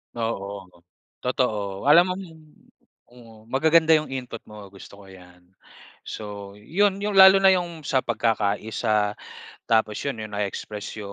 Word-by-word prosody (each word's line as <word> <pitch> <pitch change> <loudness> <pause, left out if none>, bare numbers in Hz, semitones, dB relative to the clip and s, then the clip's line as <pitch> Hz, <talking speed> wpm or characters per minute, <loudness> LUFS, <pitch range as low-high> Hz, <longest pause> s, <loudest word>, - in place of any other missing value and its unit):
Oo, 100 -5 -5 0.5
totoo. 105 -6 -2
Alam 170 +4 +7
mong 195 - -7
mm. 160 -3 -16 0.9
Magaganda 160 +4 +4
'yong 155 -3 -2
input 125 -3 -6
mo, 105 -2 -11
gusto 100 +1 -14
ko 100 - -15
'yan. 90 -1 -16 0.7
So 100 -2 -8
'yon 195 - 0
'yong 205 -1 -2
lalo 190 0 +8
na 195 - +4
'yong 175 -4 -2
sa 130 - +2
pagkakaiisa, 110 -1 -1 0.5
tapos 110 -2 +1
'yon 140 -5 -4
'yong 110 - -9
nae-express. 105 +1 -5
So - - -8
115 Hz, 135 wpm, -24 LUFS, 105-160 Hz, 0.9 s, lalo